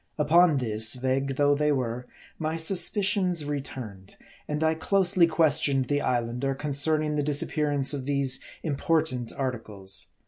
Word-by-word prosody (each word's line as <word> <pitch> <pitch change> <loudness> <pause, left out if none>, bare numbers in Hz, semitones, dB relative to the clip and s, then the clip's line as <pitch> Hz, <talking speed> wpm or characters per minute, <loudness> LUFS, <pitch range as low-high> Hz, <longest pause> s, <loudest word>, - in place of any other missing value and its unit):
Upon 160 +1 +4
this, 110 -2 +2
vague 130 +2 -2
though 145 +1 +3
they 150 +1 +1
were, 125 -2 -3 0.3
my 160 0 -2
suspicions 185 -1 +2
return 130 -9 -6
ed; - - -16 0.3
and 150 +1 -2
I 160 0 +2
closely 180 +1 +2
questioned 145 -5 +2
the 145 0 0
Islander 125 +2 -2
concerning 150 +2 0
the - - +1
dis 145 0 +1
appearance 145 -2 0
of 135 -2 -5
these 140 -2 0 0.2
important 150 -5 -1
articles. 110 -8 -5
145 Hz, 140 wpm, -26 LUFS, 130-155 Hz, 0.3 s, Upon